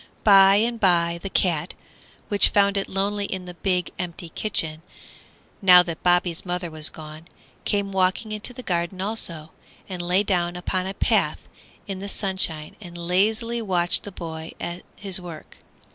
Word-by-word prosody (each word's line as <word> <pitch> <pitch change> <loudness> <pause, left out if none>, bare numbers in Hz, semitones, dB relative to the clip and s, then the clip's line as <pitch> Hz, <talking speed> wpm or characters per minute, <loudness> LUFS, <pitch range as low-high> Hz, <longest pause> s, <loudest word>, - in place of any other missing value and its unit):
By 195 -2 +7
and 230 +3 +1
by 170 -3 +2
the 195 - -5
cat, 170 -4 0 0.5
which 205 -2 +3
found 200 0 +3
it 195 - -2
lonely 200 +1 -1
in 185 -2 -5
the 180 - -8
big, 180 +1 -1
empty 175 -1 -5
kitchen, 160 -5 -2 0.8
now 180 -2 +8
that 170 -2 -6
Bobby's 175 -1 +2
mother 175 -2 -4
was 155 0 -1
gone, 155 +1 -11 0.4
came 200 -1 0
walking 190 +3 0
into 215 +3 0
the 250 +1 -10
garden 175 0 -2
also, 170 -6 -3 0.4
and 185 -2 -5
lay 180 +3 +2
down 175 -3 0
upon 185 +1 -2
a 195 - -5
path - - +1 0.4
in 195 -2 -5
the 200 +1 -6
sunshine 190 -7 0
and 175 -3 -10
lazily 215 +7 0
watched 180 -4 0
the 205 - -9
boy 160 -3 -7
at 175 +1 -5
his 190 -2 +2
work. 170 -3 -10
185 Hz, 160 wpm, -23 LUFS, 170-200 Hz, 0.8 s, now